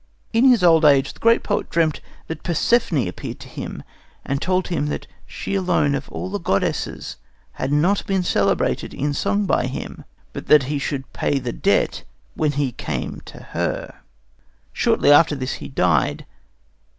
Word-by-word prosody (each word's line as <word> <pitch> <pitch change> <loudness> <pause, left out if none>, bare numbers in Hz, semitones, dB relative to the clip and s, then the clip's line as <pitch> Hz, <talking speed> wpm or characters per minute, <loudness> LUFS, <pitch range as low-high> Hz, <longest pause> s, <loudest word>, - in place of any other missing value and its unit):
In 230 +3 +4
his 245 -7 +5
old 165 -2 +6
age 140 -2 +4
the - - -20
great 230 +1 +4
poet 205 - -1
dreamt 160 -2 +1 0.2
that 160 - -6
Persephone 170 - +1
appeared 90 - -7
to - - -10
him - - -7 0.4
and 140 0 -2
told 185 0 0
him 160 -4 -1
that 150 - -4 0.2
she - - -5
alone 180 -7 +1
of 140 -1 -4
all 185 - -5
the 205 - -2
goddesses 100 - -2 0.3
had 130 - -4
not 175 +8 +2
been 190 -2 +1
celebrated - - 0
in 145 +1 -1
song 205 +8 0
by 180 - +1
him, 130 - -6 0.3
but - - -7
that 150 -2 +6
he 145 +2 -2
should 140 -1 -4
pay 145 - 0
the 125 -3 -3
debt - - +1 0.3
when 150 -2 0
he 140 -2 0
came - - -5
to - - -12
her. - - -3 0.7
Shortly 145 - +3
after 150 +1 +6
this 130 -1 -3
he - - -6
died. 90 - +1
150 Hz, 170 wpm, -21 LUFS, 135-185 Hz, 0.7 s, old